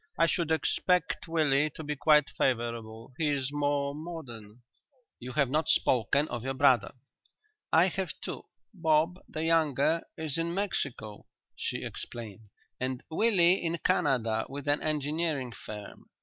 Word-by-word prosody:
I 165 - +5
should 165 0 0
expect 180 +2 +1
Willie 155 -3 +2
to 160 - -6
be 150 0 -3
quite 150 0 +4
favourable. 115 -2 -2
He 160 - +2
is 140 -2 -1
more 145 -1 0
modern." 125 -9 -9 0.6
"You 125 +1 -7
have 140 -3 +3
not 155 +2 +1
spoken 130 +5 +3
of 120 -1 -4
your 135 +1 -2
brother." 120 -6 +3 0.8
"I 165 +2 +6
have 190 -2 -2
two. - - -6 0.3
Bob, 165 0 +2
the 155 - -4
younger, 160 -1 +2 0.2
is 160 -1 -2
in 170 +1 -1
Mexico," 140 - -3 0.3
she - - -3
explained; 110 -2 -6 0.3
"and 130 0 -3
Willie 185 -2 +4
in 170 0 -1
Canada 115 -8 +1
with 145 +1 -7
an 145 0 +2
engineering 150 -3 -1
firm. 105 -2 -10
145 Hz, 140 wpm, -29 LUFS, 125-165 Hz, 0.8 s, I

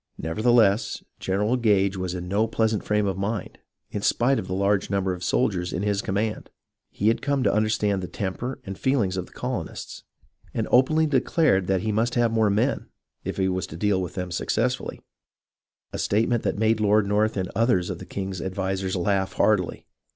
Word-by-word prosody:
Nevertheless, 110 +5 +2 0.2
General 105 +6 0
Gage 100 -4 +2
was 90 -1 -3
in 90 0 -5
no 105 +4 +1
pleasant 110 -1 0
frame 105 0 +1
of 95 -1 -2
mind, 105 +3 -3 0.3
in 100 - -3
spite 130 +6 +2
of 95 - -6
the 95 - -2
large 100 +1 +1
number 95 -1 0
of 90 0 -7
soldiers 90 -5 0
in 95 - -2
his 100 -1 0
com 95 - -3
mand. 105 +1 -2 0.4
He 105 - +1
had 115 - +1
come 140 -2 0
to - - +2
understand 105 -2 +1
the 90 - -4
temper 105 +9 -4
and 95 -1 -7
feel 130 -3 +2
ings 95 -1 -2
of 90 - -3
the - - -20
colonists, - - -5 0.5
and - - -1
openly 155 +5 +4
declared 135 - +2
that 95 -1 +1
he 110 - -1
must 115 +3 0
have 120 -2 +3
more 110 -2 +3
men, 115 +7 0 0.4
if - - -4
he 95 -1 +2
was 95 -2 -1
to 80 - -9
deal 100 0 +1
with 90 - -5
them 90 -1 -4
successfully, 120 +8 -1 0.9
a - - -4
statement 115 +3 +1
that - - -1
made 110 +1 +2
Lord 105 0 +3
North 105 +2 +1
and 95 -2 -2
others 110 -6 +2
of - - -6
the - - -8
king's 95 -2 -4
advisers 95 0 -2
laugh 95 +1 0
heartily. 100 -5 +1
100 Hz, 195 wpm, -25 LUFS, 95-115 Hz, 0.9 s, openly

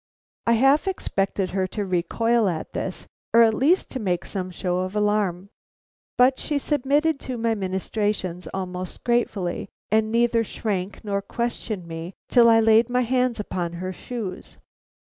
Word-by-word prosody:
I 235 - +5
half 270 +8 +4
expected 195 - -1
her 190 -1 0
to 205 +1 -3
recoil 205 +5 +1
at 160 -3 -5
this, - - -4 0.3
or 230 - +9
at 225 -1 +4
least 305 +11 +2
to 260 - -3
make 180 -5 -1
some 185 -2 -4
show 180 0 -2
of 185 +2 -3
alarm, 205 -3 0 0.7
but 255 +1 +5
she 295 - -1
submitted 290 +2 +1
to 255 -2 -5
my 230 0 +1
ministrations 190 -2 -2
almost 185 -1 -5
gratefully, 225 -7 0 0.2
and 220 0 +2
neither 235 0 +3
shrank 200 -2 -4
nor 200 -1 -1
questioned 220 -3 -3
me 165 +2 -7
till 235 -2 +6
I 225 0 +6
laid 225 +1 +5
my 250 +1 +2
hands 250 -1 +1
upon 175 -4 -3
her 185 +2 -4
shoes. 205 -2 -6
215 Hz, 155 wpm, -24 LUFS, 185-240 Hz, 0.7 s, or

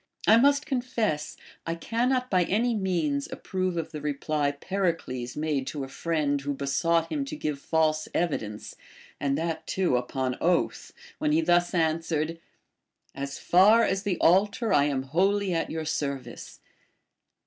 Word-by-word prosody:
I 220 - +7
must 280 +4 +4
confess, 240 - -2 0.3
I 165 - -1
cannot 250 +7 0
by 180 -2 +3
any 235 +6 +1
means 170 -9 -1
approve 185 -2 -3
of 160 -1 -3
the 150 - -6
reply 150 0 -1
Pericles 145 -7 -3
made 150 -3 -1
to 145 -3 -4
a - - -5
friend 145 -1 -1
who 140 0 -3
be 140 - -4
sought 165 +4 +1
him 290 -2 -1
to 275 - -6
give 150 - -3
false 155 0 +1
evidence, 110 -11 -3 0.4
and 140 -1 0
that 160 0 -3
too 180 -9 +1
upon 130 +1 -2
oath, 175 0 0 0.3
when 150 - +1
he 160 - +4
thus 175 +2 +2
answered: 165 -1 0 0.7
As 140 0 -5
far 210 +6 +5
as 195 -2 0
the 200 -4 -1
altar 205 +6 +3
I 140 - +5
am 135 -3 -1
wholly 190 +7 +1
at 165 - -1
your 160 0 -4
service. 140 -3 -4
165 Hz, 155 wpm, -27 LUFS, 145-190 Hz, 0.7 s, I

